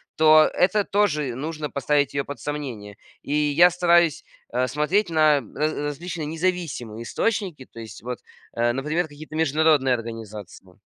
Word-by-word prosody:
то 155 0 +6
это 200 +3 +2
тоже 150 - 0
нужно 150 +2 -4
поставить 140 0 0
ее 140 - 0
под 145 -3 -7
сомнение. 120 -8 -6 0.2
И 140 - -5
я 150 +4 +5
стараюсь, 175 -2 +3 0.3
а, 125 +1 0
смотреть 160 - 0
на 155 -3 +4
раз 155 +1 0
различные 150 +3 -4
независимые 160 -9 -3
источники. 185 - -2
То 115 - -11
есть 110 -1 -10
вот, 125 +1 -5 0.4
э, 120 0 +2
например, 150 +6 -1
какие-то 155 +1 -11
международные 155 -3 +3
организации. 110 -5 -7
150 Hz, 145 wpm, -23 LUFS, 125-160 Hz, 0.4 s, то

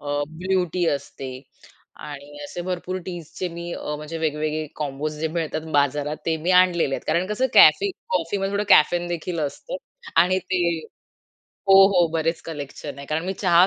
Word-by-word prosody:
अ, 145 - -8 0.2
blue 180 +3 0
T 180 -1 +1
असते 135 -2 -4 0.7
आणि 145 0 -9
असे 160 - -6
भरपूर 185 +1 -3
टीज 175 -4 -7
चे 180 - -1
मी 170 0 -6
अ, 150 - -4
म्हणजे 150 +2 -6
वेगवेगळे 155 0 -1
कॉम्बोज 150 +1 -3
जे 160 - 0
मिळतात 160 -1 -2
बाजारात, 145 +1 +1
ते 160 - +2
मी 165 +3 -2
आणलेले 175 -6 +2
आहेत - - -5
कारण 175 +2 +2
कसं 210 +6 0
कॅफे 400 0 +7 0.3
कॉफीमध्ये 195 +3 -2
थोडं 205 +1 0
कॅफेन 175 0 +5
देखील 170 -1 -3
असतं. 155 - -4 0.4
आणि 180 +3 +5
ते 185 -1 -1 1.1
हो, 195 0 +9
हो. 180 -3 +4
बरेच 165 0 0
कलेक्शन 145 -2 -7
आहे 140 - -8
कारण 155 +2 -1
मी 190 - -1
चहा 175 0 +6
165 Hz, 170 wpm, -23 LUFS, 150-180 Hz, 1.1 s, हो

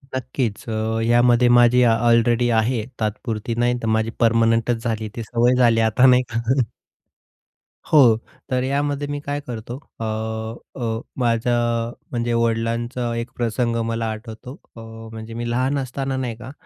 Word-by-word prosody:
नक्कीच. 125 -4 -3
अ, 110 - -2 0.3
यामध्ये 120 +1 +4
माझी 120 +1 +5
अलरेडी 120 +1 +3
आहे 110 -1 0
तात्पुरती 110 +1 -3
नाही. 120 +1 +2
तर 115 - -3
माझी 110 0 0
परमनंटच 115 0 +2
झाली, 110 -2 -2
ती 115 - -4
सवय 120 +3 +2
झाली 120 -2 +4
आता, 125 +4 +3
नाही 125 0 +6
का. 115 - 0 1.5
हो, 125 -8 +6 0.3
तर 125 0 +1
यामध्ये 145 +1 -1
मी 145 0 -3
काय 145 0 -1
करतो, 120 +1 -6 0.2
अ, 115 - -3 0.7
अ, 115 -2 -2 0.2
माझ 115 -1 +1
अ, 120 -1 0 0.2
म्हणजे 120 -1 -1
वडिलांचा 115 +1 -1
एक 115 +1 -4
प्रसंग 120 0 0
मला 115 0 -2
आठवतो. 110 +3 -9 0.2
अ, - - -10 0.3
म्हणजे 110 0 -8
मी 120 +1 -4
लहान 130 +4 0
असताना 135 0 -3
नाही 125 -3 -3
का, 125 +2 -9
120 Hz, 150 wpm, -21 LUFS, 115-125 Hz, 1.5 s, नाही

